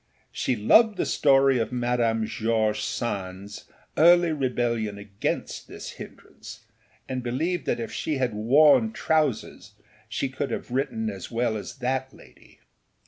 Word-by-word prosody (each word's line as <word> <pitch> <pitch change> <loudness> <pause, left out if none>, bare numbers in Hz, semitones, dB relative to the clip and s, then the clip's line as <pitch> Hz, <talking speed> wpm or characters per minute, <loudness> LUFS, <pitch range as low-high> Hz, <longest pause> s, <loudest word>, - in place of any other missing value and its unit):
She 130 - -1
loved 210 - +4
the - - 0
story 135 -2 +3
of 115 - -2
Madame 120 -2 0
George 110 -1 0
Sandâs 100 -3 -5 0.3
early 175 +1 +5
rebellion 120 -7 -1
against 100 -1 -4
this - - -8
hindrance, - - -12 0.4
and 130 -1 -3
believed 155 +9 -2
that - - 0
if 115 - -5
she 155 - -2
had 130 -4 -1
worn 150 - +4
trousers 155 - -1 0.4
she 140 - -2
could 135 +1 -4
have - - -5
written 220 - -1
as - - -8
well 115 -1 -1
as 105 - -6
that 130 0 -2
lady. - - -19
125 Hz, 140 wpm, -25 LUFS, 110-145 Hz, 0.4 s, early